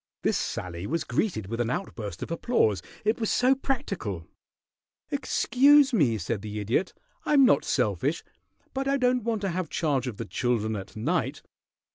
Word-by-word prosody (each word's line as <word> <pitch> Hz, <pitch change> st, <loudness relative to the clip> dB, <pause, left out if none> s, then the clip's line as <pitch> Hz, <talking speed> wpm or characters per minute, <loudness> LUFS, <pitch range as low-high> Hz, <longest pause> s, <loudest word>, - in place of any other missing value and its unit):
This -, -, +2 dB
sally 85 Hz, +1 st, -4 dB
was 165 Hz, +3 st, -1 dB
greeted 175 Hz, -, -1 dB
with 115 Hz, +4 st, -3 dB
an 115 Hz, -, -1 dB
outburst 115 Hz, -, -4 dB
of -, -, -7 dB
applause, 165 Hz, -, +1 dB, 0.2 s
it 215 Hz, +3 st, +2 dB
was 220 Hz, -, 0 dB
so 255 Hz, +2 st, +4 dB
practical. 200 Hz, -, -3 dB, 0.9 s
"Excuse 280 Hz, +1 st, +4 dB
me!" 135 Hz, -, +3 dB
said 100 Hz, +2 st, -3 dB
the 105 Hz, 0 st, -5 dB
Idiot. 115 Hz, -, -1 dB, 0.3 s
"I'm 280 Hz, -3 st, +5 dB
not -, -, +4 dB
selfish, -, -, 0 dB, 0.5 s
but 270 Hz, 0 st, -2 dB
I 275 Hz, 0 st, +2 dB
don't 250 Hz, -1 st, +2 dB
want 225 Hz, -2 st, -1 dB
to 195 Hz, -, -1 dB
have 180 Hz, -2 st, -3 dB
charge 140 Hz, -5 st, 0 dB
of 115 Hz, -5 st, -5 dB
the -, -, -4 dB
children 110 Hz, -3 st, -1 dB
at 100 Hz, +1 st, -7 dB
night. 110 Hz, -, -1 dB
160 Hz, 165 wpm, -27 LUFS, -, 0.9 s, I'm